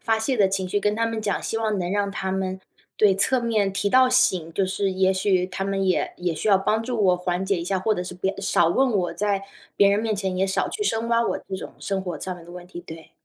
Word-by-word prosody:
发 225 -1 +1
泄 255 +3 -1
的 200 -3 +4
情 190 -1 -2
绪 205 - +1
跟 210 +1 +1
他 230 0 +1
们 225 -1 -3
讲， 200 -3 -1
希 225 - -2
望 215 -3 0
能 175 0 -2
让 200 0 0
他 190 -1 -3
们 190 0 -2 0.4
对， 205 -3 +5
侧 245 +6 +2
面 215 -4 +1
提 200 +1 0
到 255 +3 +5
醒， 185 -10 +2
就 190 +2 0
是 195 +1 -1
也 190 0 +2
许 185 -1 +1
他 195 +1 -4
们 195 0 -1
也 185 - +1
也 175 -2 -1
需 155 - -4
要 195 -2 +6
帮 220 +3 0
助 235 -3 -2
我 180 -1 +4
缓 180 +1 -2
解 195 0 0
一 170 - -4
下， 190 +1 0
或 215 +3 +1
者 180 - -3
是 180 - -6
别 190 +2 -2
少 175 -3 +2
问 260 +8 +2
我， 185 -5 0
在 200 -1 -1 0.3
别 200 - +6
人 200 +1 +3
面 220 -1 0
前 190 -2 -2
也 190 +1 +1
少 190 - 0
去 420 - -4
深 230 - -1
挖 235 0 +3
我 - - -1
这 190 - -3
种 - - -8
生 195 -1 -2
活 180 -2 -5
上 185 -1 -4
面 170 - -13
的 175 - -13
问 175 0 -10
题， 175 -1 -9
对。 160 0 -10
195 Hz, 300 characters per minute, -24 LUFS, 185-215 Hz, 0.4 s, 要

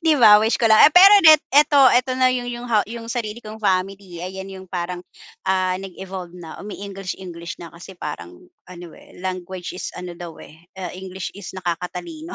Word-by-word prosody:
'Di 320 - +5
ba 210 -3 +9
wish 220 +3 +1
ko 230 - +3
lang. 220 - +6
Eh, 295 - +6
pero 385 +3 +9
net 310 -2 +9
'eto 285 -2 +6
'eto 255 +1 +1
na 255 0 +3
yun-g 245 -1 -2
yung 245 - -8
ha 215 -3 +2
yung 230 +1 -9
sarili 235 -2 -4
kong 215 -1 -9
family, 190 -2 -2
ayan 190 +2 -7
yung 190 0 -10
parang, 175 0 -4 0.5
ah, 185 -1 +1
nag-evolve 185 -2 -8
na, 165 -3 -10
umi-English-English 190 -4 -7
na 170 -1 -10
kasi 175 +2 -12
parang 85 - -7 0.3
ano, 175 -1 -10
eh, - - -17
language 185 0 -6
is 180 - -6
ano 180 -1 -7
daw, 170 -1 -10
eh, 155 +1 -17 0.2
ah, 185 -2 -6
English 185 0 -7
is 200 -1 -9
nakakatalino. 180 - -5
190 Hz, 190 wpm, -21 LUFS, 180-230 Hz, 0.5 s, ba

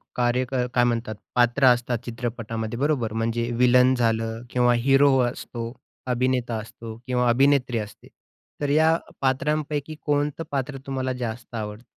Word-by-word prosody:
कार्य 125 +1 +1
अ, 125 -2 0
काय 125 - +4
म्हणतात 115 -2 -1 0.2
पात्र 120 +2 +3
असतात 120 0 -2
चित्रपटामध्ये 115 -1 -4
बरोबर, 135 -6 0
म्हणजे 115 +1 -1
व्हिलन 125 +1 +5
झालं 115 -1 0
किंवा 125 -1 +3
हिरो 135 0 +5
असतो, 115 -1 -6 0.4
अभिनेता 125 -1 0
असतो 110 +1 -10
किंवा 125 -1 +1
अभिनेत्री 130 0 +3
असते, 105 -1 -7 0.5
तर 145 - 0
या 160 +3 +4 0.3
पात्रांपैकी 150 +2 -1
कोणतं 145 +2 0
पात्र 135 0 -2
तुम्हाला 130 -1 -2
जास्त 120 -1 -6
आवडतं? 105 +1 -6
125 Hz, 135 wpm, -24 LUFS, 115-135 Hz, 0.5 s, व्हिलन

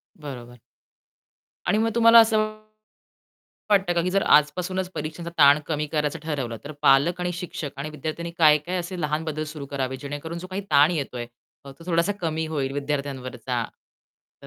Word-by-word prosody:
बरोबर. 125 -5 -9 1.1
आणि 210 - +3
मग 225 +1 +2
तुम्हाला 230 0 +8
असं 225 -1 +5 1.3
वाटतं 195 -3 +3
का 170 - +2
की 180 - -1
जर 195 +1 +2
आजपासूनच 180 +5 0
परीक्षांचा 160 +3 -5
ताण 145 0 +7
कमी 150 -1 -1
करायचं 150 +1 -1
ठरवलं, 135 -7 -3
तर 145 - -7
पालक 150 +6 +4
आणि 180 0 -1
शिक्षक 175 -4 -5
आणि 150 +2 -4
विद्यार्थ्यांनी 155 +3 -5
काय-काय 155 +2 +4
असे 180 +1 -5
लहान 150 +1 -1
बदल 155 -1 -3
सुरू 145 -3 -7
करावेत, 130 -1 -3
जेणेकरून 145 +5 -6
जो 180 - -7
काही 190 +2 -3
ताण 145 +2 +6
येतोय, 130 -7 -3 0.4
तो 140 - -10
तो 150 +5 -16
थोडासा 170 +2 +1
कमी 160 -1 -1
होईल 140 -4 -2
विद्यार्थ्यांवरचा. 130 -4 -3 0.8
तर - - -11
155 Hz, 160 wpm, -24 LUFS, 140-175 Hz, 1.3 s, तुम्हाला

